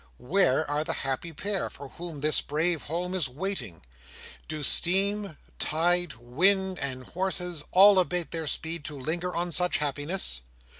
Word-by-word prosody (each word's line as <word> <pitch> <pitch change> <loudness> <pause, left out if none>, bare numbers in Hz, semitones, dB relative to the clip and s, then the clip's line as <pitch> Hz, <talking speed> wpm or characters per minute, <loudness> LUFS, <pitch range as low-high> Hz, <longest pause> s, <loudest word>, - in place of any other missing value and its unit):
Where 155 +1 +1
are 145 +1 -1
the - - -2
happy 135 +5 -3
pair, 200 +5 -3
for 140 -1 -11
whom 165 -1 -8
this 155 +1 +3
brave 160 +2 0
home 175 +4 -4
is 170 -8 0
waiting? 130 - -4 0.6
Do 155 -1 -5
steam, 195 +2 +2 0.2
tide, 175 +1 +1
wind, 185 - +2
and 130 -2 -3
horses, 180 0 -2
all 195 +1 +7
abate 180 -2 0
their 165 -2 -3
speed, 160 +1 -2
to 150 -2 -6
linger 175 +6 -3
on 175 +1 -1
such 180 +2 +3
happiness? 145 - -1
165 Hz, 150 wpm, -27 LUFS, 145-180 Hz, 0.6 s, all